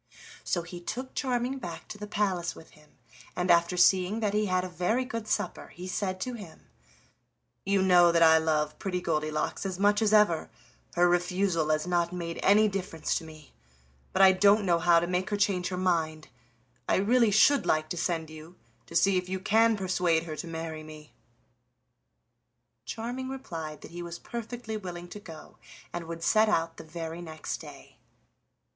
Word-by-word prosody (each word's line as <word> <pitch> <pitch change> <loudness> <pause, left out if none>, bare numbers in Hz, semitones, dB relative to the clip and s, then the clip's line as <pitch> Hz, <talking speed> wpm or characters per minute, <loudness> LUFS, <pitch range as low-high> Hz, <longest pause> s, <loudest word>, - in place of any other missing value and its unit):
So 175 - -1
he 175 +1 -9
took 255 +8 -5
Charming 255 0 -1
back 175 -8 -8
to 215 - -7
the 210 - -6
palace 190 -5 -1
with 160 - -14
him, 150 0 -22 0.4
and 180 0 +1
after 170 +1 +3
seeing 185 +3 +4
that 210 -2 0
he 210 0 +1
had 185 -1 +1
a - - -3
very 180 +9 -1
good 230 -3 -5
supper 210 -1 -2
he 180 +1 -9
said 185 0 -2
to 250 - -3
him: 200 -9 -10 1.1
"You 195 -1 +3
know 175 -2 +6
that 170 0 +4
I 160 0 +7
love 155 -1 -1
Pretty 180 -2 -2
Goldilocks 155 -3 -2
as 190 -2 -3
much 205 +2 +3
as 215 -2 +2
ever, 210 -7 +3 0.5
her 175 0 +4
refusal 175 -2 +1
has 155 0 +1
not 175 -1 0
made 170 -2 -5
any 210 +2 +5
difference 185 -5 -3
to - - -12
me; 155 -2 -13 0.6
but 195 - +3
I 190 - +9
don't 200 +2 +4
know 170 -2 +3
how 170 0 +5
to 170 - -1
make 180 +1 -1
her 205 - -1
change 190 -3 +1
her 180 - -4
mind; 160 -4 -1 0.6
I - - +4
really 230 +4 +3
should 245 +7 +4
like 155 0 +1
to - - -3
send 165 -2 -2
you, 155 +3 -12 0.3
to 170 - -10
see 195 +2 +4
if 180 0 -8
you 190 0 -2
can 225 +3 +3
persuade 180 -4 +1
her 160 -2 -6
to 170 - -6
marry 160 -1 -5
me." 155 -1 -12 1.7
Charming 245 - -5
replied 165 - -6
that - - -11
he 175 +1 -7
was 170 0 -6
perfectly 235 0 -6
willing 175 -3 -7
to 210 - -8
go, 165 -6 -12 0.4
and 175 -1 -4
would 165 0 -6
set 215 +3 +4
out 165 -4 0
the - - -9
very 165 +1 -6
next 160 -2 -5
day. - - -13
180 Hz, 185 wpm, -28 LUFS, 165-205 Hz, 1.7 s, I